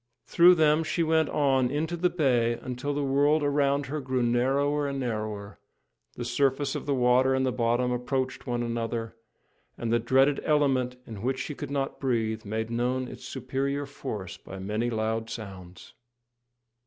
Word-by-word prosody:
Through 180 +1 +6
them 155 -1 +4
she 165 +1 0
went 160 -1 +2
on 135 -3 +2
into 155 +5 -1
the 180 +1 +1
bay 125 -9 +2
until 125 +4 -4
the 145 0 -1
world 145 +3 +3
around 140 -1 +2
her 150 +3 -4
grew 130 -1 -1
narrower 140 +5 +1
and 140 -1 -3
narrower, 110 -4 -4 0.6
the 120 - -5
surface 135 +3 +1
of - - -5
the 140 - +2
water 130 +1 +3
and 130 0 +1
the 130 - +1
bottom 120 +1 +1
approached 130 +2 -2
one 120 -1 -1
another, 115 -1 -3 0.6
and 115 -1 -2
the 120 - +4
dreaded 135 +4 +3
element 135 -4 +2
in 110 -4 -8
which 130 +3 -1
she 150 - -4
could - - -6
not 140 -1 -2
breathe 115 -4 -1
made 110 +2 -3
known 125 +2 0
its - - -10
superior 135 +2 -2
force 110 -10 -6
by 95 - -10
many 105 +5 -2
loud 110 0 -2
sounds. 95 -5 -9
130 Hz, 165 wpm, -27 LUFS, 115-140 Hz, 0.6 s, Through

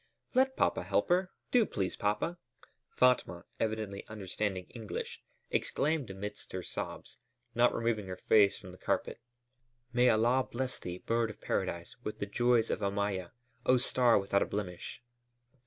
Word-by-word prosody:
"Let 265 +1 +3
papa - - +2
help - - +1
her! 180 +1 +3 0.2
Do 245 -2 +6
please, 95 - -2
papa!" 105 +12 -1 0.5
Fatma, 125 -9 +2
evidently 110 -3 -2
understanding 100 -2 -3
English, 115 -3 -5 0.3
exclaimed 150 -5 0
amidst 105 +2 -7
her 95 -1 -3
sobs, - - -6 0.3
not 120 +1 +5
removing 115 -4 -1
her 90 0 -5
face 100 -2 +6
from 95 - -10
the 90 - -14
carpet: - - -1 0.7
"May 125 +1 +5
Allah 120 +4 +3
bless 125 +1 -2
thee, 90 0 -5
bird 115 +3 0
of 105 0 -9
paradise, 90 -5 -2
with 105 - -4
the - - -2
joys 120 +2 +2
of - - -2
Omayya, 100 -2 -1 0.4
oh, 130 - +6
star 125 -1 +4
without 100 0 +2
a - - +1
blemish!" 100 +3 -5
110 Hz, 150 wpm, -32 LUFS, 100-125 Hz, 0.7 s, Do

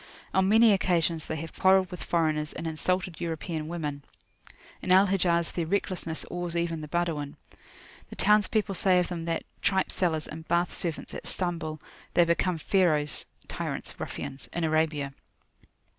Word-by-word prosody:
On 190 0 +3
many 225 +1 +7
occasions 170 -4 +1
they 160 - -3
have 160 +1 -6
quarrelled 190 0 +4
with 180 - -6
foreigners, 155 -3 0
and 165 - -6
insulted 175 +2 -1
European 160 -1 -3
women. 150 -4 -4 0.8
In - - -2
Al 190 +2 +7
Hijaz 175 -4 +2
their 170 -2 -2
recklessness 180 -3 -1
awes 175 -1 -2
even 170 -2 -1
the 150 - -6
Badawin. 155 -3 -2 0.7
The - - -9
townspeople 210 0 +3
say 185 0 +4
of 180 - +1
them 170 -2 -4
that, 165 -1 -1 0.2
"tripe 190 -1 +2
sellers, 160 -4 0
and 160 +1 -9
bath 170 +1 +1
servants, 165 -3 -4
at - - -6
Stambul, 170 -4 -2 0.4
they 175 - +6
become 170 +1 +1
Pharaohs 155 -4 +2 0.2
(tyrants, - - -4
ruffians,) 135 - -6
in 175 - -1
Arabia." 155 -3 +1
170 Hz, 155 wpm, -28 LUFS, 160-185 Hz, 0.8 s, many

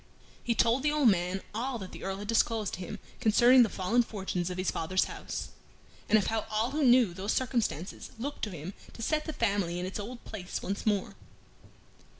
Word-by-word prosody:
He 235 - +1
told 235 +4 +3
the 295 +2 +2
old 295 -5 +5
man 185 0 0
all 245 +3 -2
that 190 -4 -8
the - - -9
Earl 195 0 -2
had 205 +1 -7
disclosed 225 -2 +1
to - - -4
him 180 - -5 0.2
concerning 245 +3 +6
the 230 - +4
fallen 210 +7 +2
fortunes 190 -6 -3
of 180 - -5
his 185 0 0
father's 185 +3 +1
house, - - -5 0.6
and 220 - +6
of 205 - +1
how 220 -1 -1
all 220 +3 0
who 300 +1 0
knew 245 -7 +5
those 195 +4 -2
circumstances 235 - -1
looked 280 +5 -5
to - - -6
him 175 +1 -7 0.2
to 230 - -7
set 305 +5 0
the 315 - -3
family 200 - 0
in 180 - -2
its 190 +3 -4
old 235 +4 -7
place 190 -5 -5
once 200 +3 -3
more. 205 -3 +1
215 Hz, 205 wpm, -30 LUFS, 190-240 Hz, 0.6 s, concerning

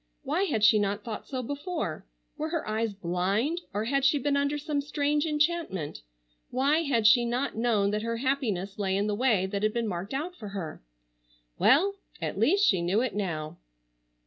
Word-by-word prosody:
Why 390 - +1
had 225 - -1
she 215 0 +7
not 205 0 -1
thought 220 -3 -6
so 260 -2 -3
before? 285 - -4 0.3
Were 310 +1 -3
her 330 -1 -2
eyes 220 +1 0
blind, 195 - 0
or 205 +2 -1
had 275 +3 +1
she 275 +2 +4
been 280 +1 0
under 285 +1 +1
some 295 -1 -2
strange 295 +1 0
enchantment? 300 - -1 0.5
Why 275 +5 +2
had 255 -8 +1
she 240 +2 +7
not 245 +3 -1
known 220 -3 +2
that 210 0 -1
her 230 +1 -2
happiness 225 -7 -1
lay 190 -1 +1
in 200 - +1
the 210 - 0
way 215 -4 +2
that 200 +1 -3
had 215 0 +1
been 235 -1 -1
marked 190 +5 -4
out 340 +6 -3
for 215 - -8
her? 195 -5 -6 0.8
Well, 390 +9 +4 0.2
at - - -3
least 400 +4 +4
she 185 -3 +3
knew 185 +6 +1
it 255 -2 -1
now. 165 -7 -3
235 Hz, 190 wpm, -28 LUFS, 200-285 Hz, 0.8 s, she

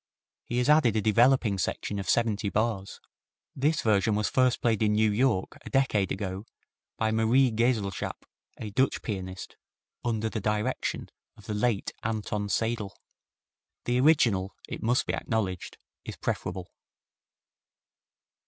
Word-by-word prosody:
He 120 - -3
has 125 - +1
added 150 -7 +5
a 110 - +2
developing 115 -2 +3
section 100 +2 -2
of 95 - -5
seventy 110 -3 +1
bars. 105 -2 -2 0.6
This 150 +3 +1
version 105 -1 +2
was 105 0 0
first 130 -2 +2
played 115 -3 +1
in 105 -1 +3
New 110 0 +3
York 105 -3 0
a - - -8
decade 110 -8 +1
ago 95 +1 -4 0.5
by 110 0 +1
Marie 115 +4 +3
Geselschap, 110 -3 -1 0.3
a 105 - -6
Dutch 130 +6 +1
pianist, 95 -3 -6 0.5
under 110 -2 -1
the 110 -1 -3
direction 105 +1 -2 0.3
of - - -16
the 105 - -4
late 105 -1 0
Anton 105 -2 -2
Seidl. 110 -2 -1 0.9
The 120 +1 +1
original, 120 -10 +3
it - - -6
must 120 +3 +1
be - - -2
acknowledged, 100 -6 -2 0.3
is - - -7
preferable. 95 -1 -4
110 Hz, 135 wpm, -28 LUFS, 100-120 Hz, 0.9 s, added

